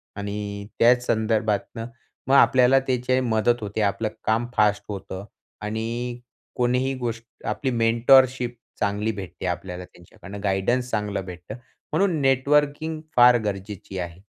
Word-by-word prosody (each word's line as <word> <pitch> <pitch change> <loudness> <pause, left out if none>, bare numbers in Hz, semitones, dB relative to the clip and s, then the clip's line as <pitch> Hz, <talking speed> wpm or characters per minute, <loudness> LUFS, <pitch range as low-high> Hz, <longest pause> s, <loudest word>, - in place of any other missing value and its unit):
आणि 100 0 -5
त्याच 120 +1 +5
संदर्भातनं 110 0 0 0.4
मग 135 - +4
आपल्याला 130 -1 +6
त्याची 130 0 +1
मदत 120 -1 +1
होते. 105 +1 -3
आपलं 105 +2 0
काम 115 +2 +1
फास्ट 105 -1 +3
होतं 95 -1 -6 0.4
आणि 115 +3 -3 0.4
कोणीही 125 +2 +1
गोष्ट 115 -2 -4 0.2
आपली 135 - -1
मेंटरशिप 120 +2 +4 0.2
चांगली 105 +2 0
भेटते 95 -2 -7
आपल्याला 90 0 -4
त्यांच्याकडनं. 95 +3 -12
गाईडन्स 105 +6 0
चांगलं 105 -2 -2
भेटतं. 90 -1 -8 0.4
म्हणून 185 -5 +2
नेटवर्किंग 145 +4 +2 0.2
फार 120 0 +7
गरजेची 100 -1 -5
आहे. 85 +2 -6
115 Hz, 120 wpm, -24 LUFS, 100-125 Hz, 0.4 s, फार